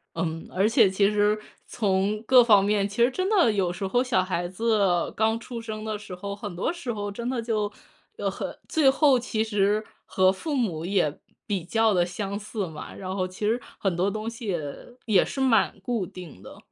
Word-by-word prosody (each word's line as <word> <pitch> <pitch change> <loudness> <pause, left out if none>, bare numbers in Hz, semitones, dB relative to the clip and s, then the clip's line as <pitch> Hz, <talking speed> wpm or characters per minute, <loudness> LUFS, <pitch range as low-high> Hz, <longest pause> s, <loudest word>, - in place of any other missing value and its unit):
嗯， 165 -1 -3
而 195 +3 +2
且 225 -4 +5
其 200 +1 +3
实 210 0 +2 0.3
从 200 0 0
各 250 +1 +7
方 205 -4 +6
面， 205 0 +1
其 215 +4 +1
实 245 - +3
真 370 +7 -1
的 360 - +4
有 190 -4 0
时 195 +2 -4
候 245 +6 +2
小 225 -8 +1
孩 175 -2 -2
子 195 -2 +1
刚 220 +1 +1
出 235 0 -7
生 215 -1 -6
的 215 -1 -2
时 195 -3 -9
候， 200 +2 -5
很 205 -3 -7
多 185 - -1
时 315 -8 -5
候 205 -1 -4
真 235 +4 -5
的 255 -3 -1
就， 215 -3 -1 0.5
呃 - - -1
很 - - -6
最 300 -4 +4
后 270 -1 +4
其 225 -2 -1
实 210 0 +1 0.2
和 185 0 +3
父 290 +10 -4
母 175 - -1
也 180 -6 0 0.3
比 200 -6 -2
较 225 +4 +2
得 175 - +3
相 195 +3 -4
似 210 -1 -4
嘛， 160 - -9
然 190 0 -5
后 185 -1 -1
其 185 +3 -5
实 230 +3 +1 0.2
很 190 -4 -1
多 185 +3 +1
东 215 +2 -4
西 230 -1 -8
也 175 -4 0 0.5
也 205 -5 +4
是 - - -6
蛮 225 -6 +2
固 230 -2 -1
定 175 - -11
的。 - - -12
205 Hz, 225 characters per minute, -26 LUFS, 190-230 Hz, 0.5 s, 各